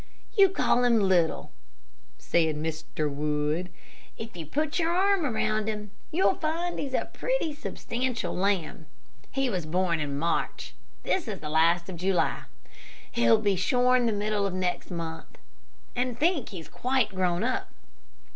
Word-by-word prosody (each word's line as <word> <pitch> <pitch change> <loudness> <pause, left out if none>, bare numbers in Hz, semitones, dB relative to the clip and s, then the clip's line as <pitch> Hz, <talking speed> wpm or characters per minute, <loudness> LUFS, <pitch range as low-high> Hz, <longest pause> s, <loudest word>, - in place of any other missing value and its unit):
"You 395 -3 +7
call 250 -9 +2
him 235 -2 +4
little," 185 -5 +2 0.7
said 160 -2 +1
Mr. 155 0 -3
Wood; 150 +4 -1 0.5
"if 225 -2 -8
you 165 -3 -7
put 305 - -1
your 330 -1 +1
arm 375 -1 +3
around 215 -3 0
him, 210 -2 -4 0.2
you'll 360 +4 +3
find 335 +1 -2
he's 270 -2 -2
a - - -2
pretty - - -1
substantial 255 -4 -3
lamb. 180 -4 -1 0.4
He 270 0 0
was 180 -9 -2
born 175 0 +1
in 145 -2 -2
March. 165 +3 -1 0.3
This 365 -8 0
is 205 -4 -4
the 150 - -6
last 170 +2 +3
of 185 -3 -6
July; 185 +1 0 0.7
he'll 120 - +4
be 205 -2 +1
shorn 250 +5 +3
the - - +2
middle 205 -1 0
of 185 - -4
next 185 -1 -2
month, 165 -2 -6 0.6
and 250 -1 -1
think 310 -2 +1
he's 170 -5 -8
quite 255 -3 0
grown 180 -2 +1
up. - - -1
200 Hz, 150 wpm, -28 LUFS, 170-255 Hz, 0.7 s, You